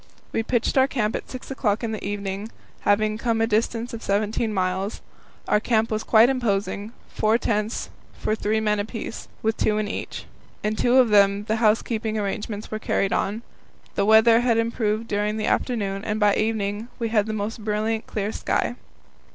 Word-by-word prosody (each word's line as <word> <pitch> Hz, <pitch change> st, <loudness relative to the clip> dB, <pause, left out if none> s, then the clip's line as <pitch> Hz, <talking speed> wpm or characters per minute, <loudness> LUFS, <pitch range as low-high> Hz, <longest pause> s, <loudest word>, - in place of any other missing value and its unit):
We -, -, 0 dB
pitched 240 Hz, +3 st, +1 dB
our 265 Hz, -, +5 dB
camp 220 Hz, -6 st, -1 dB
at -, -, -5 dB
six 255 Hz, +1 st, -8 dB
o'clock 225 Hz, -4 st, 0 dB
in 225 Hz, -, -1 dB
the 215 Hz, -, -5 dB
evening, 200 Hz, +1 st, -4 dB, 0.3 s
having 215 Hz, +1 st, +1 dB
come 230 Hz, -2 st, 0 dB
a 225 Hz, -, +3 dB
distance 230 Hz, +2 st, 0 dB
of 225 Hz, -, -5 dB
seventeen 215 Hz, +2 st, 0 dB
miles. 190 Hz, +1 st, -1 dB, 0.5 s
Our 210 Hz, -, +3 dB
camp 225 Hz, 0 st, +1 dB
was 215 Hz, 0 st, -1 dB
quite 225 Hz, +1 st, +6 dB
imposing 215 Hz, -4 st, -1 dB, 0.2 s
four 215 Hz, +1 st, +2 dB
tents 215 Hz, -1 st, -1 dB, 0.3 s
for -, -, -1 dB
three 220 Hz, 0 st, 0 dB
men 210 Hz, -1 st, +1 dB
apiece, 225 Hz, +2 st, -5 dB, 0.2 s
with 220 Hz, 0 st, +1 dB
two 210 Hz, -1 st, +1 dB
in 215 Hz, -1 st, -1 dB
each. 205 Hz, -, -5 dB, 0.4 s
In 210 Hz, +1 st, 0 dB
two 245 Hz, +3 st, +3 dB
of 255 Hz, -3 st, +6 dB
them 200 Hz, -1 st, +4 dB
the 220 Hz, +1 st, -1 dB
housekeeping 220 Hz, 0 st, +1 dB
arrangements 210 Hz, +1 st, -4 dB
were 215 Hz, -, -3 dB
carried 195 Hz, -2 st, 0 dB
on. 215 Hz, +4 st, -1 dB, 0.5 s
The 200 Hz, -, +1 dB
weather 220 Hz, +2 st, +6 dB
had 240 Hz, -2 st, +2 dB
improved 230 Hz, -1 st, 0 dB
during 210 Hz, +1 st, -1 dB
the 215 Hz, -, -1 dB
afternoon, 200 Hz, -5 st, -1 dB
and 215 Hz, -1 st, -2 dB
by 205 Hz, -1 st, +4 dB
evening 215 Hz, 0 st, -1 dB
we 230 Hz, -2 st, -2 dB
had 215 Hz, -2 st, +2 dB
the 220 Hz, -, -2 dB
most 215 Hz, +1 st, -4 dB
brilliantly 220 Hz, +1 st, -1 dB
clear 210 Hz, 0 st, -1 dB
sky. 240 Hz, -, -1 dB
215 Hz, 185 wpm, -24 LUFS, 210-225 Hz, 0.5 s, quite